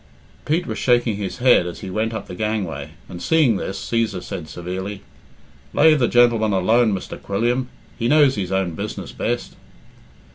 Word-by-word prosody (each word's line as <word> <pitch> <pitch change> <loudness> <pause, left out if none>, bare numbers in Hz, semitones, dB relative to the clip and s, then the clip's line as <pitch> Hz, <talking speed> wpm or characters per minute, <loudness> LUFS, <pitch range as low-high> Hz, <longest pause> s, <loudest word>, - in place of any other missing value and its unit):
Pete 165 +4 0
was - - -4
shaking 120 -4 +2
his 100 +1 -4
head 125 -8 +4
as 85 - -7
he 95 - -6
went 110 +3 -1
up 110 - -5
the - - -9
gangway, 90 -8 -3
and 85 - -9
seeing 150 -10 +3
this, 95 - -4
Cæsar 115 -6 -1
said 80 - -6
severely 95 +5 -6 0.7
"Lave 155 0 +5
the 120 - +3
gentleman 115 -3 +3
alone, 110 +5 +3
Mr. 95 -2 -5
Quilliam. 120 +6 -1 0.3
He 115 - 0
knows 145 -1 +5
his 95 -5 -3
own 95 -2 0
business - - -5
best." - - -3
110 Hz, 170 wpm, -21 LUFS, 95-120 Hz, 0.7 s, Lave